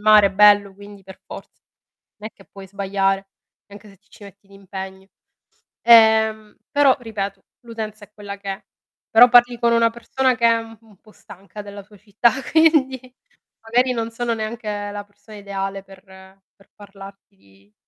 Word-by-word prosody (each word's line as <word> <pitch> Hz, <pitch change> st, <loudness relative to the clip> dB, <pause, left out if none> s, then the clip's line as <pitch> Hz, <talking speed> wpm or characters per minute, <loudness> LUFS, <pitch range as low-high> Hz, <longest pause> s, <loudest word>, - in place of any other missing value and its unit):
mare 210 Hz, -2 st, +5 dB
bello, 205 Hz, 0 st, +4 dB
quindi 200 Hz, 0 st, -14 dB
per 190 Hz, 0 st, -15 dB
forza. -, -, -12 dB, 0.6 s
Non 210 Hz, -, -11 dB
è 220 Hz, -, -8 dB
che 195 Hz, -, -20 dB
puoi 195 Hz, -1 st, -13 dB
sbagliare, 195 Hz, 0 st, -2 dB, 0.4 s
anche 205 Hz, +1 st, -14 dB
se 195 Hz, -, -18 dB
ti 200 Hz, +2 st, -38 dB
ci -, -, -17 dB
metti 200 Hz, 0 st, -16 dB
d'impegno. 190 Hz, -1 st, -10 dB, 0.8 s
Ehm, 220 Hz, -2 st, +4 dB
però 285 Hz, -2 st, +4 dB
ripeto, 200 Hz, -4 st, -6 dB, 0.2 s
l'utenza 220 Hz, -2 st, -8 dB
è 210 Hz, -, -38 dB
quella 205 Hz, -1 st, -9 dB
che 200 Hz, -1 st, -6 dB
è, 195 Hz, -, -8 dB, 0.5 s
però 240 Hz, +2 st, +7 dB
parli 245 Hz, 0 st, +4 dB
con 235 Hz, 0 st, +1 dB
una 230 Hz, 0 st, +3 dB
persona 250 Hz, +2 st, -1 dB
che 235 Hz, -, 0 dB
è 230 Hz, 0 st, +3 dB
u 225 Hz, 0 st, -11 dB
un 220 Hz, -3 st, -22 dB
po' 215 Hz, -, -22 dB
stanca 200 Hz, +2 st, -13 dB
della 200 Hz, 0 st, -10 dB
sua 210 Hz, +2 st, -21 dB
città, 210 Hz, +3 st, +1 dB, 0.2 s
quindi, 310 Hz, -5 st, +3 dB, 0.6 s
magari 245 Hz, +3 st, +1 dB
non 230 Hz, -2 st, -3 dB
sono 235 Hz, 0 st, -3 dB
neanche 215 Hz, -2 st, -5 dB
la 205 Hz, 0 st, -7 dB
persona 205 Hz, +1 st, -17 dB
ideale 195 Hz, -1 st, -6 dB
per 195 Hz, -1 st, -17 dB, 0.5 s
per 195 Hz, -, -26 dB
parlarti 195 Hz, 0 st, -15 dB
di. 100 Hz, -, -27 dB
205 Hz, 170 wpm, -20 LUFS, 195-230 Hz, 0.8 s, però